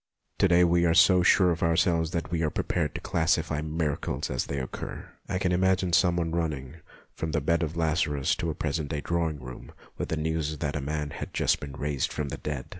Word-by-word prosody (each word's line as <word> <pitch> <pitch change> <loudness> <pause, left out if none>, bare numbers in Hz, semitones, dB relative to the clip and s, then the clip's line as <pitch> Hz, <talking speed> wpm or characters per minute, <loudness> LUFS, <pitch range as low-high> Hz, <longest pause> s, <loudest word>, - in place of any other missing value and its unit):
To - - +5
day 90 0 +5
we 85 0 +3
are 80 - +3
so 90 +2 +6
sure 90 0 +5
of 80 - -3
ourselves 85 0 +2
that 85 -1 -3
we 85 -2 0
are 80 - +1
pre - - -2
pared - - -1
to - - -4
classify 80 -2 0
miracles 75 -4 -2
as 65 - -1
they 70 - -3
occur. 65 - -6 0.2
I 90 - 0
can 90 -1 0
imagine 95 0 +2
some 90 0 +4
one 85 -2 -1
running 80 -4 -3 0.4
from 80 -1 -4
the 80 - +2
bed 85 +4 +1
of 80 0 -3
Lazarus 80 -4 +1
to 85 - -2
a 80 - -3
present 75 -1 -2
day 75 -2 -2
drawing 80 -3 -1
room, 65 -1 -10 0.3
with - - -3
the 80 - -1
news 80 -1 -1
that 70 0 -2
a 75 - -2
man 75 +1 -3
had - - -7
just - - +2
been 70 -2 -7
raised 70 -1 -2
from 75 -2 -3
the - - -5
dead. 70 -4 -4
80 Hz, 230 wpm, -27 LUFS, 75-85 Hz, 0.4 s, so